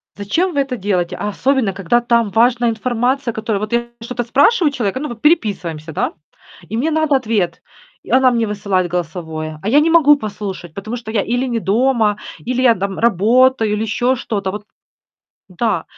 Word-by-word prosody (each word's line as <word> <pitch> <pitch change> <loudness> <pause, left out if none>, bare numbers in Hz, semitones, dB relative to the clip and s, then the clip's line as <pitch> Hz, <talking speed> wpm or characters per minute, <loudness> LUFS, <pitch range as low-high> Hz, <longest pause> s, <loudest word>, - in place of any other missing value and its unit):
Зачем 330 - -1
вы 285 - 0
это 270 -2 -3
делаете? 185 -3 -1
А 205 - -2
особенно 255 -2 0
когда 195 +5 +1
там 235 -3 +2
важная 240 +1 +3
информация, 245 +3 -1
которую 220 -2 -2
вот 215 +2 -4
я 235 0 +1 0.2
что-то 240 +1 -4
спрашиваю 290 - +3
человека, 240 -2 -2
ну, 300 - -4
вот 235 -2 -9
переписываемся, 185 - 0
да. - - -1 0.6
И 225 - -2
мне 285 +7 0
надо 315 -2 +2
ответ. 215 -7 -1 0.4
И - - -10
она 260 0 +5
мне 230 -2 0
высылает 195 -3 -1
голосовое, 160 -2 -4
а 200 - -5
я 285 - +5
не 320 - +2
могу 310 -3 +6
послушать, 200 - -6
потому 215 +6 -5
что 225 -2 -8
я 220 -2 +1
или 245 +5 -1
не 235 -2 -1
дома, 220 0 +1 0.3
или 255 0 0
я 250 -2 +6
там 195 0 -3
работаю, 230 +2 +3
или 210 - -1
еще 245 +4 0
что-то. 200 -5 -3
Вот 210 +1 -6 0.9
Да. 190 -1 -1
225 Hz, 185 wpm, -18 LUFS, 200-255 Hz, 0.9 s, могу